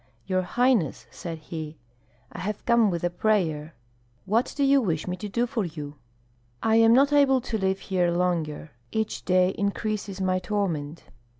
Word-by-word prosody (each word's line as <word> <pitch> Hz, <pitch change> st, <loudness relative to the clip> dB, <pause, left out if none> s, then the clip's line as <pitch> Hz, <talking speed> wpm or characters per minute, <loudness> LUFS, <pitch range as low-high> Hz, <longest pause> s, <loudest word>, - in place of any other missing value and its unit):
"Your 185 Hz, 0 st, +1 dB
highness," 205 Hz, -, +1 dB
said 165 Hz, -2 st, -6 dB
he 155 Hz, -1 st, -7 dB, 0.5 s
"I -, -, -8 dB
have 205 Hz, +4 st, -4 dB
come 235 Hz, -3 st, +4 dB
with 170 Hz, -2 st, -3 dB
a 175 Hz, -, +1 dB
prayer." 165 Hz, -6 st, 0 dB, 0.5 s
"What 220 Hz, +5 st, +1 dB
do 285 Hz, -, +2 dB
you 275 Hz, 0 st, +5 dB
wish 165 Hz, -8 st, -1 dB
me 180 Hz, -, -2 dB
to 205 Hz, +3 st, -6 dB
do 235 Hz, +4 st, +1 dB
for 235 Hz, -3 st, -2 dB
you?" 150 Hz, -4 st, -6 dB, 0.7 s
"I 220 Hz, 0 st, +4 dB
am 225 Hz, 0 st, +6 dB
not 280 Hz, +3 st, +4 dB
able 275 Hz, -2 st, +5 dB
to 230 Hz, -2 st, -3 dB
live 190 Hz, 0 st, +1 dB
here 180 Hz, -3 st, +1 dB
longer. 170 Hz, -4 st, -1 dB, 0.2 s
Each 220 Hz, -1 st, -2 dB
day 185 Hz, 0 st, +3 dB
increases 200 Hz, 0 st, -3 dB
my 185 Hz, -1 st, +1 dB
torment. 170 Hz, -6 st, -2 dB
190 Hz, 170 wpm, -26 LUFS, 170-220 Hz, 0.7 s, am